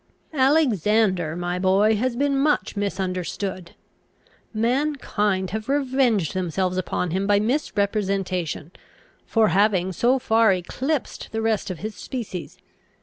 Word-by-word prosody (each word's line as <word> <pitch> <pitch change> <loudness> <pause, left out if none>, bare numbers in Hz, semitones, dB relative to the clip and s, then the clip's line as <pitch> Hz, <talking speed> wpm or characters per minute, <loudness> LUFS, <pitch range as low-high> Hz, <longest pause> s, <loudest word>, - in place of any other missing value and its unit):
"Alexander, 215 - +2
my 175 +1 -2
boy, 195 +4 +3
has 240 +3 -1
been 280 +2 +1
much 290 -2 +1
misunderstood. 185 -2 -3 0.8
Mankind 220 -6 0
have 220 +4 -4
revenged 260 - +1
themselves 185 0 -1
upon 180 -1 -2
him 190 +3 -1
by 205 -1 +4
misrepresentation, 200 - -1 0.6
for 225 -2 +3
having 190 -2 +2
so 240 +8 +2
far 225 -4 +3
eclipsed 260 - -3
the 225 - -2
rest 220 -2 0
of 185 - -4
his 215 +4 -5
species. 220 -10 -6
205 Hz, 115 wpm, -23 LUFS, 185-240 Hz, 0.8 s, by